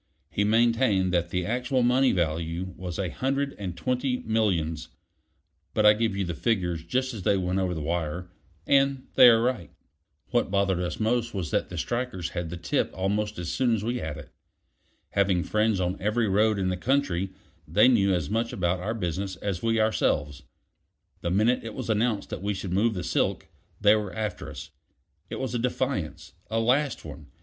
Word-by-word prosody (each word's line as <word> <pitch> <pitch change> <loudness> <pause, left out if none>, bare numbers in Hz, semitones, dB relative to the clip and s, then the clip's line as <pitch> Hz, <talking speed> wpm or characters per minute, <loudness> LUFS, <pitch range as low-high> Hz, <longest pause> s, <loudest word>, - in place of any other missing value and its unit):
He 100 - +1
maintained 110 -4 +3
that 85 -1 +1
the 90 0 -1
actual 125 +3 0
money 125 +2 +4
value 85 +1 -2
was 90 -2 -6
a 95 -3 -1
hundred 140 - -1
and 90 -4 -5
twenty 125 +6 0
millions; 85 -8 0 0.9
but 110 - +3
I 105 - +9
give 110 -2 0
you 100 - 0
the 85 - -3
figures 90 -6 -1
just 130 +9 -1
as 110 - -6
they 100 +2 +2
went 90 0 0
over 90 -2 -1
the 80 - -4
wire, 85 +2 -3 0.3
and 135 -1 +2
they 125 - +9
are 115 -1 +5
right. 120 - -1 0.6
What 120 -4 +1
bothered 100 -2 +1
us 90 -1 -3
most 120 +1 0
was 90 -5 -3
that - - 0
the 90 - -6
strikers 120 -3 -2
had 85 -2 -4
the 85 - -5
tip 85 -3 0
almost 105 +3 -1
as 90 -1 -4
soon 120 -3 +2
as 105 - -3
we 120 +3 -1
had 80 -1 -4
it. 75 - -10 0.8
Having 95 -3 +2
friends 110 -2 +1
on 90 +1 -2
every 110 +3 +1
road 105 +2 +3
in 95 -1 0
the 90 - -1
country, 95 -5 0 0.4
they 105 +10 +5
knew 100 -6 +4
as 85 -6 0
much 115 +4 -1
about 90 0 0
our 105 +5 -3
business 95 -1 -3
as 90 0 -3
we 115 -1 +1
ourselves. 75 -10 +1 0.8
The 85 - -1
minute 110 +7 +2
it 115 - -7
was 125 -4 -2
announced 110 -1 0
that - - -4
we 100 +1 -1
should 95 -2 -4
move 110 +3 +2
the 90 - -3
silk, - - -1 0.3
they 105 0 +6
were 105 -3 -2
after 110 -1 -4
us. - - -9 0.6
It - - -5
was 130 -2 -3
a 120 - 0
defiance; 125 - -2 0.2
a 115 +1 0
last 130 - +1
one. 75 -1 -9
100 Hz, 195 wpm, -27 LUFS, 90-115 Hz, 0.9 s, I